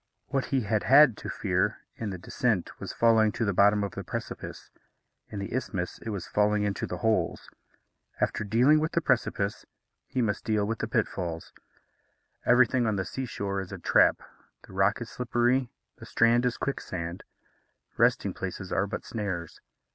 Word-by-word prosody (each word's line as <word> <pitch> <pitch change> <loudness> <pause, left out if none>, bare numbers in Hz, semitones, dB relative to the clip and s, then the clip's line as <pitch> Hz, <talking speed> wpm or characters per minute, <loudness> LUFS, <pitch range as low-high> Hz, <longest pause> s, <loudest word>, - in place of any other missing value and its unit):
What 135 -2 0
he 135 -2 0
had 105 -1 -1
had 135 -3 +7
to - - -7
fear - - 0 0.2
in 110 - -4
the 95 - -5
descent 100 +1 -1
was - - -5
falling 110 -2 +4
to 115 - -1
the 100 - 0
bottom 105 +2 +4
of 100 - -3
the - - -6
precipice; - - -7 0.6
in 105 - -7
the 100 +1 -5
isthmus, 105 -8 -3
it 115 - -7
was 100 -5 -4
falling 105 0 +2
into 100 -1 -2
the - - -4
holes. 110 -7 0 0.7
After - - 0
dealing 125 +9 +4
with 155 +1 -2
the - - +3
precipice, 100 -9 0 0.4
he - - -3
must 110 -4 0
deal 105 -2 +1
with 115 +2 -3
the 110 - -2
pitfalls. 90 -7 -2 0.9
Everything 125 0 +4
on 110 - +1
the 95 -1 -2
sea 130 +9 -4
shore 100 -3 -3
is 95 - -9
a 95 - -5
trap 85 - +3 0.4
the - - -15
rock 95 +4 +2
is 115 - -6
slippery, 125 +1 +1 0.3
the - - -10
strand 120 +2 +3
is 120 - -2
quicksand. 90 -10 -4 0.7
Resting - - +2
places 95 0 -6
are 95 +1 +1
but 100 - -5
snares. 95 -7 -4
105 Hz, 175 wpm, -28 LUFS, 100-120 Hz, 0.9 s, had